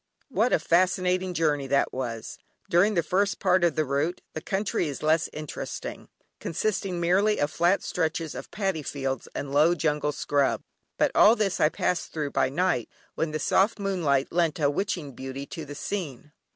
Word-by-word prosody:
What 235 0 +1
a - - +5
fascinating 180 +2 +1
journey 150 -4 +1
that 140 +1 +1
was. 120 -4 -5 0.3
During 200 +5 +4
the 170 - +2
first 190 +3 +1
part 180 0 +2
of 170 -3 +3
the 155 - +1
route 145 +6 -1
the 160 - -5
country 195 -1 -1
is 145 0 -6
less 155 +1 +2
interesting, 155 -1 -6 0.3
consisting 190 0 -2
merely 195 +5 +3
of 145 +1 0
flat 175 +3 +2
stretches 160 -2 -2
of - - -8
Paddy 195 -6 -2
fields 135 -3 -3
and 140 - -4
low 155 +4 +5
jungle 150 -2 0
scrub. 145 -1 0 0.3
But - - +2
all 220 - +7
this 205 -5 0
I 150 - +5
passed 180 +2 -1
through 150 -3 -3
by 130 - +2
night, 145 -5 0 0.2
when 160 - -1
the 155 - -2
soft 195 +8 +2
moonlight 170 -9 0
lent 170 -2 +1
a 145 -2 +3
witching 175 -3 -2
beauty 135 +2 -6
to 160 +2 -7
the 145 0 -8
scene. 150 -6 -5
160 Hz, 180 wpm, -26 LUFS, 145-185 Hz, 0.3 s, all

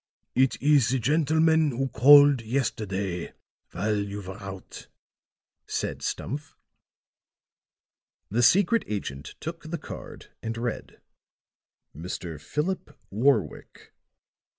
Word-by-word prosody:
"It 130 0 +2
is 145 -4 +4
the 130 - +1
gentleman 160 +4 +3
who 135 +1 -2
called 140 +3 +7
yesterday 100 -7 -2 0.4
while 105 +4 -1
you 100 0 -5
were 95 +3 -8
out," 95 -1 -9 0.8
said - - -3
Stumph. 145 - -4 1.8
The 115 +4 +1
secret 195 - +4
agent 75 -9 -5
took 165 0 -7
the 170 - -3
card - - -10
and 115 0 -4
read: 120 0 -5 1.0
"Mr. 80 -1 -6
Philip 150 - -3
Warwick." 130 +8 -1
120 Hz, 100 wpm, -26 LUFS, 100-150 Hz, 1.8 s, called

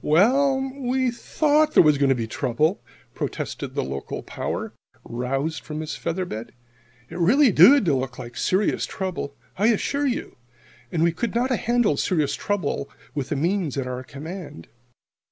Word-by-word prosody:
"Well, 265 - +4 0.2
we 260 -1 0
thought 305 +5 +1
there - - +8
was 150 -3 +4
going 140 -1 +3
to 135 - +4
be 115 -2 -2
trouble," 135 - 0 0.3
protested - - -4
the - - 0
local 70 +1 -5
power, - - -4 0.3
roused 135 +6 -2
from 150 0 -6
his 155 0 -4
feather 175 +2 -2
bed. 110 -9 -7 0.6
"It 170 - -6
really 245 - +5
did 195 - +7
look 130 -4 0
like 120 0 -8
serious 190 +8 +1
trouble, 185 -7 -4 0.2
I 210 - +4
assure 280 +5 +1
you. 250 - -3 0.5
And 165 -2 +1
we 170 - +4
could 230 +7 -3
not 250 +3 +1
have 250 - +1
handled 235 -10 +2
serious 155 -7 +1
trouble 180 -8 -2 0.2
with 140 -3 -3
the 155 - -1
means 170 0 0
at 135 - -1
our 125 0 -4
command. 150 - -8
170 Hz, 165 wpm, -24 LUFS, -, 0.6 s, there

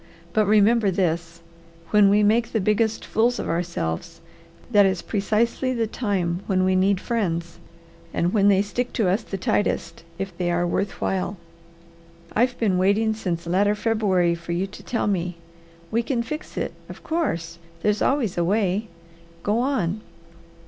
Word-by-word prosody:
But 215 -2 +3
remember 215 +1 +4
this, 170 -2 -1 0.5
when 210 -2 +6
we 210 +1 +4
make 225 +3 +2
the 225 - +2
biggest 215 +2 +1
fools 240 +2 +1
of - - -4
ourselves 165 - -3 0.5
that 205 -3 +6
is 190 -2 +1
precisely 230 +5 0
the 230 -1 +1
time 195 -6 -1
when 185 -2 +2
we 185 0 +2
need 190 +1 +3
friends, 170 -8 -2 0.5
and 175 +2 0
when 200 -2 +4
they 200 -1 +5
stick 245 +4 -3
to 220 -6 +1
us 195 +5 +1
the 195 - -6
tightest, 170 -3 -1 0.2
if 195 0 -5
they 175 -1 0
are 175 0 +1
worth 195 +3 -2
while. 190 +1 -1 1.0
I've 245 +3 +2
been 195 -5 +1
waiting 210 +4 +2
since 175 -6 -3
latter 200 +4 +2
February 205 -6 +2
for 170 0 -5
you 180 +3 0
to 195 - -11
tell 235 - -2
me. 180 -3 -1 0.6
We 230 - +2
can 235 -1 -1
fix 305 +6 -7
it, - - -2 0.2
of - - -10
course; 170 - -2 0.2
there's 210 0 +1
always 240 -11 +1
a - - +2
way. 200 +2 +1 0.6
Go 210 +3 +1
on!" 215 -7 0
200 Hz, 160 wpm, -24 LUFS, 180-225 Hz, 1.0 s, when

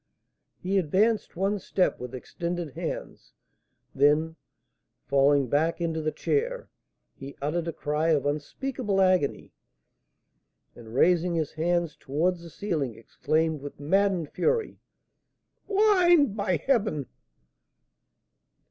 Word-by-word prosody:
He 195 +2 0
advanced 205 +7 +1
one 195 +3 0
step 185 0 0
with 125 +1 -7
extended 170 +4 -4
hands, - - -6 0.6
then, 150 +4 +3 0.7
falling 140 0 +3
back 155 +7 +1
into 165 -2 -1
the 155 0 -1
chair, - - -2 0.4
he 135 +1 -10
uttered 160 +4 -2
a - - -1
cry 150 +1 -1
of 145 -4 +2
unspeakable 200 - -2
agony, 185 -6 +1 1.2
and, 115 -1 -11
raising 175 +3 +3
his 160 -3 -1
hands 170 0 0
towards 170 +6 -1
the 170 - -10
ceiling, 155 - -3
exclaimed, 155 +6 -1
with 145 0 -9
maddened 180 +1 +1
fury: 465 -1 0 0.9
"Blind, 360 - +4
by 200 -4 0
heaven!" 215 - 0
170 Hz, 110 wpm, -27 LUFS, 145-200 Hz, 1.2 s, Blind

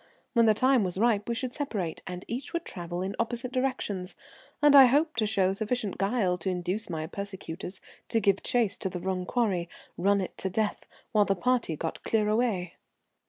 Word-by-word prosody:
When 230 -2 +5
the 215 - +5
time 255 0 +4
was 180 -1 -2
ripe 215 -1 +2
we 235 - 0
should 250 +1 -3
separate, 210 - -3
and 180 +1 -6
each 250 +7 -5
would 340 0 -2
travel 175 0 -5
in 195 +1 -3
opposite 240 +2 -2
directions, 250 -8 -2 0.4
and 295 -1 +6
I 270 -1 +11
hoped 290 +2 +2
to 215 - +2
show 190 -3 +2
sufficient 215 0 -2
guile 195 -3 +1
to 180 - -2
induce 185 +4 -2
my 160 -2 -3
persecutors 190 0 -6 0.3
to 225 - +2
give 200 -2 +2
chase 230 -5 +1
to 190 - -2
the 180 - -5
wrong 185 0 -2
quarry. 195 -8 0 0.3
Run 200 +3 +3
it 190 - -4
to 190 - -1
the - - -14
death, 215 0 -1 0.2
while 210 -3 +4
the 195 - +1
party 245 -4 +1
got 160 +2 -4
clear 215 -2 +1
away. 210 -6 0
205 Hz, 200 wpm, -28 LUFS, 185-240 Hz, 0.4 s, I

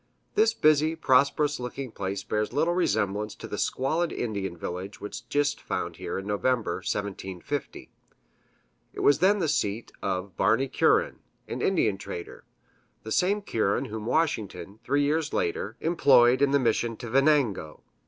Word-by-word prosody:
This 225 +1 +3
busy, 155 -1 +3
prosperous 145 0 +2
looking 125 +1 -5
place 95 -1 -4
bears 105 0 -1
little 160 +6 +1
resemblance 105 - 0
to - - -9
the - - -5
squalid 160 +6 0
Indian 100 -6 -3
village 90 +4 -6
which 105 - -8
Gist 145 0 0
found - - -4
here - - -4
in 95 - -5
November, 105 -1 0
1750. 100 +6 -5 1.0
It - - -8
was 145 - +4
then 195 +5 +4
the 175 -5 0
seat 115 -6 -1
of 95 +1 -3
Barney 115 +7 +2
Curran, 445 - +2 0.3
an - - -5
Indian 110 - +1
trader 85 -2 -8 0.6
the 110 - -7
same 200 - +1
Curran 110 - 0
whom 110 0 -6
Washington, 105 - -1
three 145 0 +1
years 150 +2 0
later, 100 +6 -2
employed 130 -7 +5
in 140 - +4
the 140 - +4
mission 115 -2 0
to 120 - -7
Venango. 135 - +1
125 Hz, 150 wpm, -27 LUFS, 100-150 Hz, 1.0 s, employed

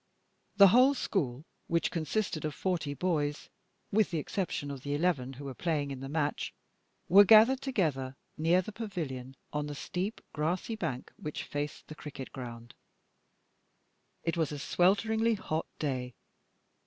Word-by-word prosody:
The 200 -2 +10
whole 255 +7 +6
school, 145 - -1 0.2
which 170 0 +1
consisted 165 +1 -1
of 155 -1 -3
forty 165 -6 -1
boys, 150 -4 -1 0.4
with 215 0 +3
the 170 - -2
exception 155 -3 -2
of 135 -2 -7
the 145 +1 -2
eleven 145 -5 0
who 140 +2 -9
were 135 - -4
playing 145 -1 -1
in 135 - -5
the 135 +1 -6
match, 150 -1 -1 0.5
were 195 +4 +9
gathered 225 +6 +7
together 150 - -1 0.2
near 170 +4 +3
the 215 - -7
pavilion 155 - -5 0.2
on 150 0 -1
the 145 - -5
steep, 185 +8 -3
grassy 170 +8 -1
bank 155 - -4
which 150 - -5
faced 145 0 -4
the - - -8
cricket 145 -3 -8
ground. 120 -2 -8 1.5
It 165 - 0
was 160 -3 +1
a 150 - -4
swelteringly 220 +9 +2
hot 160 -6 -3
day. 125 -4 -2
155 Hz, 150 wpm, -31 LUFS, 140-190 Hz, 1.5 s, The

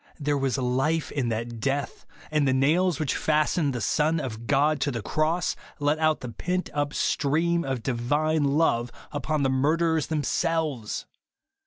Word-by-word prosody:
There 145 0 0
was 135 -1 0
life 135 +5 0
in 130 -5 -1
that 115 +1 -3
death; 140 +4 -2 0.2
and 150 -2 +2
the 130 - +3
nails 165 +6 +2
which 150 -4 0
fastened 155 0 +1
the - - -2
Son 155 +9 +1
of 115 -5 -6
God 145 +1 +3
to - - +1
the 120 -5 -4
cross, 160 - 0 0.2
let 145 +1 +1
out 155 -1 +2
the 125 - -5
pent 180 - -2
up 145 0 -1
stream 170 +4 +1
of 130 -4 -3
divine 145 +6 +1
love 140 -5 +2 0.2
upon 145 +1 -1
the 135 - +2
murderers 160 +4 +2
themselves 155 -5 -1
145 Hz, 160 wpm, -26 LUFS, 130-155 Hz, 0.2 s, the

